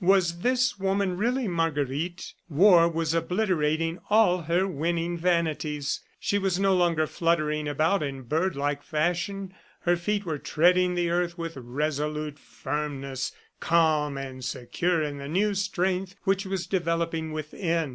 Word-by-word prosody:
Was 175 -2 +3
this 250 +1 +1
woman 195 -1 0
really 240 +5 0
Marguerite?... 165 -1 -2 0.2
War 170 +1 +6
was 165 -1 -1
obliterating 165 -2 0
all 205 -4 +4
her 170 +4 +1
winning 170 +1 -1
vanities. 160 -4 0 0.2
She 205 - 0
was 190 -2 0
no 195 -1 +3
longer 170 -3 +2
fluttering 155 -2 0
about 155 +6 +1
in 135 -3 -4
bird 160 +7 0
like 145 0 -1
fashion. 175 +6 -2 0.3
Her 175 0 +3
feet 205 +4 -1
were 155 -4 -3
treading 180 +4 +3
the 175 -1 0
earth 175 0 0
with 165 -1 -5
resolute 150 +3 -3
firmness, 135 -1 -4 0.3
calm 155 -4 +2
and 130 -1 -6
secure 140 +7 -1
in 145 -1 -4
the 140 - -6
new 200 +7 +1
strength 190 -1 -1
which 195 0 +1
was 190 -2 -2
developing 165 -3 -1
within. 160 +1 -2
170 Hz, 140 wpm, -27 LUFS, 150-185 Hz, 0.3 s, War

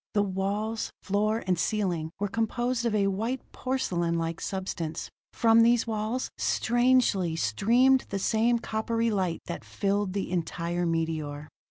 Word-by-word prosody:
The 205 - +4
walls, 205 +3 -2
floor 215 +3 0
and 180 -2 +1
ceiling 180 -5 0
were 205 - 0
composed 235 +3 -1
of 220 - 0
a 200 -1 +3
white 225 +7 -1
porcelainlike 170 -10 -1
substance: 175 -4 -4 0.2
from 230 -1 +5
these 235 0 +4
walls, 220 +3 -2
strangely, 240 -8 +2
streamed 235 - +3
the 200 - -2
same 225 +4 +2
coppery 230 0 -1
light 185 -5 -1
that 170 - -6
filled 200 -1 -1
the 195 -3 -3
entire 175 0 -1
meteor. 155 -3 -2
205 Hz, 135 wpm, -28 LUFS, 175-230 Hz, 0.2 s, from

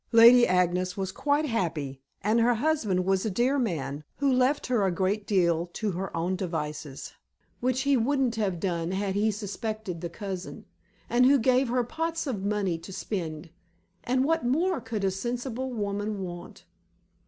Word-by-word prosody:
Lady 235 +2 +8
Agnes 180 +1 +1
was 190 -1 -2
quite 290 +7 +1
happy, 160 - -2 0.2
and 215 +4 +3
her 240 +1 +4
husband 220 -9 +1
was 190 0 +2
a 220 - 0
dear 250 +8 +1
man, 150 - -2
who 280 -2 +2
left 255 +3 +2
her 245 -5 +1
a 190 - +2
great 195 +3 -1
deal 170 -4 +2
to 215 -2 -2
her 185 0 -4
own 175 +3 0
devices 150 -6 -5 0.5
which 255 +1 0
he 280 0 +3
wouldn't 260 0 +1
have 195 -6 -1
done 170 -2 -1
had 195 0 -1
he 210 +2 +2
suspected 210 -3 -4
the 170 - -4
cousin; 190 0 -6 0.4
and 250 +1 +4
who 280 +1 +6
gave 255 +2 +3
her 250 0 +1
pots 325 +6 -3
of 225 -9 -3
money 200 -4 0
to 180 - -10
spend. 165 -5 -4 0.5
And 255 +2 +1
what 325 0 +1
more 320 +6 +1
could 225 -3 -4
a 190 - +2
sensible 245 +5 -3
woman 205 -2 -2
want? 175 -1 -8
210 Hz, 170 wpm, -27 LUFS, 180-250 Hz, 0.5 s, Lady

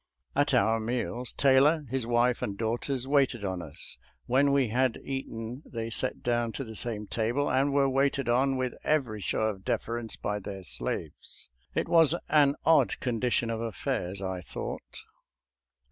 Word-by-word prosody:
At 145 -1 +3
our 115 -2 +3
meals 120 +1 -2
Taylor, 145 +3 +4
his 130 -3 -1
wife, 120 +1 +2
and 100 -1 -3
daughters, 120 +4 -1
waited 135 -6 +2
on 95 -2 -2
us; 80 -4 -8 0.3
when 135 +3 +3
we 135 -4 +3
had 125 +2 +1
eaten 125 -2 -5
they 115 -1 -5
sat 130 +3 -1
down 120 -1 0
to 135 - -4
the 110 -3 -9
same 105 -2 -2
table 120 +7 0
and 135 +2 +2
were 140 0 +3
waited 135 0 +1
on 130 +3 +2
with 130 -1 -1
every 125 -9 0
show - - -1
of 105 -3 -1
deference 115 +1 -2
by 105 0 -2
their 95 -1 -7
slaves. 85 - -4 0.2
It - - 0
was 165 -1 +5
an 145 -2 +5
odd 165 -1 +4
condition 120 -1 0
of 115 0 -3
affairs, 110 -4 -3
I 95 -1 -3
thought. 85 - -6
120 Hz, 160 wpm, -29 LUFS, 110-135 Hz, 0.3 s, was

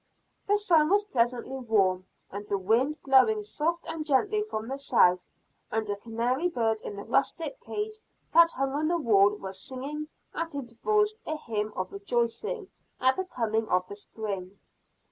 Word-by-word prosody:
The 410 +1 +4
sun 330 -7 +4
was 410 +2 +4
pleasantly 250 - -1
warm, 190 -6 +1 0.2
and 205 +1 -6
the 200 - +1
wind 235 +10 +1
blowing 250 -6 +4
soft 315 +11 -1
and 325 -1 -3
gently 360 +9 +2
from 225 - -4
the 270 +2 -4
south; 185 -10 +4 0.5
and 220 0 -1
a - - -1
canary 235 +9 -1
bird 225 -7 0
in 205 - -6
the 200 - -6
rustic 330 - 0
cage 430 +1 -4 0.3
that 335 +1 +7
hung 270 +1 -1
on 305 +2 0
the 345 +1 +2
wall 210 -8 +4
was 190 -1 -8
singing 285 +5 -5 0.3
at 330 -2 -3
intervals 420 - 0
a 310 - -1
hymn 215 -6 -3
of 185 0 -3
rejoicing 240 - -2 0.3
at 260 0 +4
the 375 - -2
coming 225 -8 -1
of 180 0 +2
the 200 - -6
spring. 200 -2 -6
250 Hz, 165 wpm, -28 LUFS, 210-325 Hz, 0.5 s, that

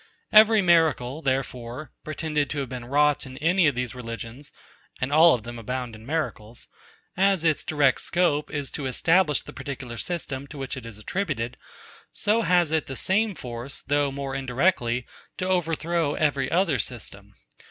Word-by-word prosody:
Every 215 -1 +7
miracle, 160 -5 +3
therefore, 130 0 -3
pretended 150 -2 -1
to 150 - -3
have 135 -3 -2
been 125 -2 -6
wrought 145 +1 +2
in 130 0 -10
any 175 +2 +3
of 145 - +1
these 125 0 -2
religions 120 +2 -8 0.5
(and 130 +3 -2
all 160 +1 +7
of 115 - -7
them 120 +1 -7
abound 125 +1 -4
in 110 +2 -13
miracles), 120 -7 -4 0.5
as 195 -2 +3
its 160 -3 +2
direct 145 -4 +2
scope 170 -4 +1
is 145 -2 -4
to 140 - -4
establish 165 +5 +2
the - - -11
particular 135 -4 -6
system 140 -6 -4
to 145 - -10
which 135 0 -4
it 125 -3 -8
is 115 -3 -9
attributed; 125 - -3 0.6
so 215 +3 +1
has 175 -6 +3
it 160 -1 0
the 135 - -5
same 200 - +1
force, 125 0 -6
though 145 0 +1
more 135 0 -4
indirectly, 125 -2 0 0.3
to 185 - -2
overthrow 165 -3 0
every 140 -4 +1
other 170 -6 +2
system. - - -6
145 Hz, 165 wpm, -25 LUFS, 125-165 Hz, 0.6 s, Every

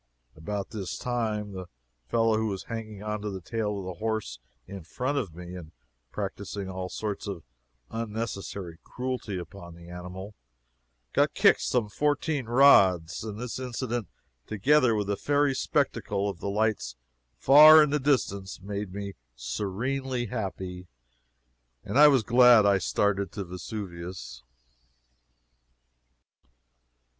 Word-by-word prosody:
About 100 +5 -5
this 100 -4 -5
time, 110 -4 -2
the 95 -2 -7 0.4
fellow 115 - +2
who 110 0 0
was 95 -3 -4
hanging 110 -3 -7
on 105 0 -3
to 105 - -3
the 95 -1 -5
tail 105 +2 -3
of 95 - -6
the 90 0 -7
horse 110 - -3 0.3
in 100 -1 -8
front 125 - -3
of 95 - -5
me 90 0 -9
and 85 -3 -10 0.4
practicing 100 +1 -5
all 95 -1 -5
sorts 105 0 -4
of 95 -5 -5 0.5
unnecessary 105 -6 -5
cruelty 125 -6 -4
upon 85 0 -9
the 85 0 -13
animal, 90 +3 -8 0.8
got - - +2
kicked - - +5
some 120 -4 0
fourteen 145 +2 -1
rods, 95 -11 +5
and 110 -1 -6
this 125 +1 -5
incident, 120 -3 -3 0.4
together 125 +3 +3
with 105 -1 -1
the 100 +1 -1
fairy 145 +3 +1
spectacle 115 -7 -1
of 95 -4 -4
the 100 - -3
lights 105 - -1 0.4
far 155 - +9
in 150 - 0
the 150 - +1
distance, 100 -9 0
made 100 0 -5
me 100 -1 -5 0.2
serenely 120 - -3
happy, 95 -4 -5 1.0
and 140 - 0
I 150 - +10
was 135 -5 +4
glad 120 -1 +6
I 100 -1 +4
started 100 -1 0
to 100 - -4
Vesuvius. 90 - -7
105 Hz, 135 wpm, -27 LUFS, 95-120 Hz, 1.0 s, I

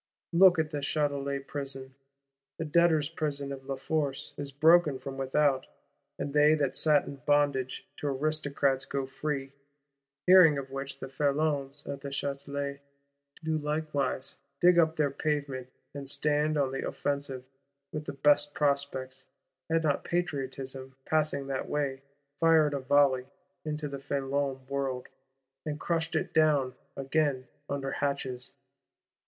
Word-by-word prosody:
Look 180 0 +7
also 160 - +2
at 155 - -16
the 150 - -2
Châtelet 140 -1 -1
Prison. 135 -2 -6 0.6
The 165 - -3
Debtors' 160 -1 +3
Prison 145 -3 -3
of 135 -1 -7
La 135 - -2
Force 140 0 -2
is 140 -1 -4
broken 155 0 +5
from 135 +1 -7
without; 135 0 +1 0.5
and 140 - -4
they 150 +1 +6
that 140 -4 0
sat 150 -2 +4
in 140 - -7
bondage 140 -1 +1
to 145 - -3
Aristocrats 140 -1 0
go 140 -1 -2
free: 135 0 -3 0.7
hearing 180 -5 +8
of 135 -1 -5
which 135 0 -5
the 135 - -6
Felons 145 0 -1
at 140 -1 -5
the 140 - -5
Châtelet 140 0 -3 0.6
do 160 0 0
likewise 150 -3 -2 0.2
"dig 175 0 +6
up 160 -1 +3
their 150 -3 +1
pavements," 140 -3 -2 0.2
and 140 -1 -5
stand 150 +1 +1
on 135 -2 +1
the 135 - -3
offensive; 140 -3 -2 0.5
with 155 0 -4
the - - -5
best 145 +1 +3
prospects,—had 140 +1 -2
not 145 -3 +1
Patriotism, 135 -5 -3
passing 155 -3 +1
that 135 -1 -3
way, 140 -2 -1 0.4
"fired 160 -3 +5
a 140 - -1
volley" 130 -1 +3 0.4
into 150 -1 -3
the 140 -1 -6
Felon 135 -1 -2
world; 135 -2 -3 0.5
and 150 -1 -4
crushed 165 0 -1
it - - -1
down 150 -5 +3 0.2
again 135 -2 0 0.2
under 135 -1 -2
hatches. 135 -3 -3
140 Hz, 140 wpm, -29 LUFS, 135-150 Hz, 0.7 s, hearing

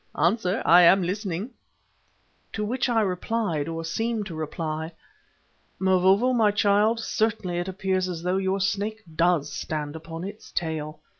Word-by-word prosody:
Answer, 185 +1 +1
I 175 +1 +8
am 185 +2 +6
listening." 195 +3 -3 1.0
To 210 -1 -2
which 245 +3 -1
I 230 -2 +3
replied, 185 -4 -1
or 165 0 -4
seemed 225 +5 -2
to 175 - -7
reply: 160 +1 -4 0.8
"Mavovo, 190 +6 +3
my 225 -4 +4
child, 210 +2 +2
certainly 215 -6 -1
it 175 - -3
appears 190 -1 -1
as 170 -2 -5
though 180 +1 +1
your 195 0 0
Snake 205 +3 -1
does 165 -4 +2
stand 150 -1 -4
upon 165 +1 -7
its 205 +3 -9
tail. 155 -2 -3
185 Hz, 145 wpm, -25 LUFS, 165-210 Hz, 1.0 s, I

